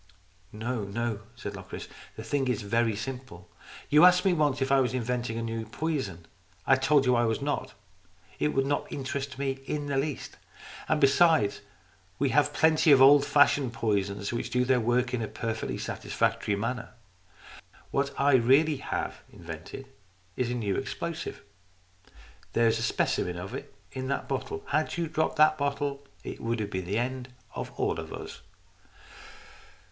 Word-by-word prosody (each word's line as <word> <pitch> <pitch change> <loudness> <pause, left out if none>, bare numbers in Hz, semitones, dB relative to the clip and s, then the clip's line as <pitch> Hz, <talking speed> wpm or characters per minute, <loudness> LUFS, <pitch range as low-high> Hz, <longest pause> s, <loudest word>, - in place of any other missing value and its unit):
" 90 0 -35
"No, 110 +1 -3
no," 110 +1 -2 0.2
said - - -6
Locris. - - -8 0.3
"The 110 - -7
thing 135 +3 0
is 125 -3 -1
very 115 +1 +1
simple. 115 -6 -7 0.4
You 150 +3 +6
asked 180 +1 +6
me 190 - +4
once 150 -5 +1
if 135 0 0
I 135 - +6
was 130 -1 +1
inventing 120 -1 -2
a 115 - -2
new 115 0 -3
poison. 110 - -3 0.4
I 135 - +6
told 135 +1 +3
you 125 - +4
that 120 - +3
I 120 - +3
was 110 -1 0
not. 145 +1 -3 0.6
It - - +2
would 135 -2 +1
not 145 +1 -1
interest 140 -1 -4
me 135 -1 -2
in 145 -1 -2
the 140 -1 -1
least. 140 0 -3 0.5
And 155 - +2
besides, 140 -6 +4 0.6
we - - +1
have - - +3
plenty 160 -1 +4
of 140 - +9
the 135 - +8
old 140 +1 +7
fashioned 145 -3 +4
poisons 100 -2 -1
which 120 - -3
do 125 0 +1
their 130 0 +3
work 120 +2 +1
in 125 - 0
a 110 - -2
perfectly 110 0 -3
satisfactory 105 - -1
manner. 115 +4 -4 1.0
What 140 0 0
I 140 0 +4
really 135 +5 +4
have - - -4
invented 85 +9 -9 0.5
is 125 -2 -1
a 125 - -1
new 105 -5 -1
explosive. 165 -1 -5 1.1
There 115 0 +4
is 115 - +2
a - - -3
specimen 90 0 0
of 90 +3 -6
it - - -7 0.2
in 130 -1 -4
that 140 - -2
bottle. 415 -1 -3
Had 195 - 0
you 170 - 0
dropped 160 0 0
the 155 0 +6
bottle, 140 0 -2 0.2
it - - -7
would 115 0 -1
have 105 -1 -3
been 95 -2 -3
the 100 +4 -1
end 130 +1 -3 0.2
of - - -5
all - - 0
of - - -7
us." - - -8
130 Hz, 175 wpm, -28 LUFS, 115-140 Hz, 1.1 s, of